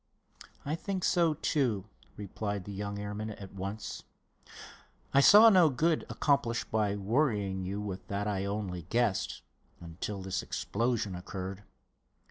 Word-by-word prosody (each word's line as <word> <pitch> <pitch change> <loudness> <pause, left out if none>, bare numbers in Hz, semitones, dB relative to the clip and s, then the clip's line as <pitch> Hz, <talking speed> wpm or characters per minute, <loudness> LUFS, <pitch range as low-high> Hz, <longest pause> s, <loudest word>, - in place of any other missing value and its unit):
"I 145 - -1
think 185 +2 -3
so, 170 -5 +3
too," 130 - 0 0.3
replied 100 -1 -4
the 100 - -7
young 100 +1 -4
airman 105 +1 -4
at 100 -3 -9
once. 100 +3 -5 1.1
"I 140 - +6
saw 210 +9 +9
no 180 -5 +6
good 155 +5 +1
accomplished 140 -5 0
by 105 -2 +1
worrying 100 -3 0
you 100 +2 -3
with 100 -3 -5
that 100 +1 -2
I 100 -2 -1
only 100 -3 -3
guessed, 115 -5 0 0.4
until 85 +4 -6
this 95 -1 -2
explosion 115 -2 -1
occurred. 95 +2 -6
105 Hz, 130 wpm, -31 LUFS, 100-125 Hz, 1.1 s, saw